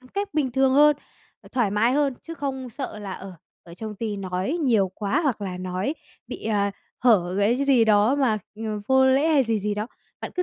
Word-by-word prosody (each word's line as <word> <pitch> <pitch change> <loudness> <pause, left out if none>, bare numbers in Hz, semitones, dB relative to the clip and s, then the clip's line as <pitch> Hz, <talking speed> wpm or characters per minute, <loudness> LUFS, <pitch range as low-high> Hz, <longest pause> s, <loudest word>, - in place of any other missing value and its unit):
ừm, 255 - -18
cách 400 -1 -4
bình 270 -5 0
thường 265 0 +3
hơn, 295 +1 +6 0.4
ờ, - - -16
thoải 240 -6 +1
mái 225 +4 +2
hơn. 280 -2 +1
Chứ 330 - -8
không 265 -4 -4
sợ 225 -3 -6
là, 200 -2 -6
ờ, 190 0 -8 0.3
ở 170 0 -13
trong 215 +2 -7
ty 215 -2 -3
nói 190 - -2
nhiều 220 -8 +3
quá, 200 +6 0
hoặc 265 -8 0
là 185 -2 -4
nói 185 +9 -2 0.3
bị, - - -8
à, 205 -2 +1 0.3
hở 190 -7 +3
gãy 205 +5 +2
cái 280 - 0
gì 250 -5 +5
đó 215 +4 +4
mà, 245 -6 +2 0.2
ừm, 215 -1 -4
vô 265 0 +5
lễ 275 +5 +3
hay 290 -4 +4
gì 225 -3 0
gì 205 +1 -1
đó, 210 +2 -3 0.3
bạn - - -6
cứ 360 - 0
225 Hz, 230 wpm, -24 LUFS, 205-270 Hz, 0.4 s, hơn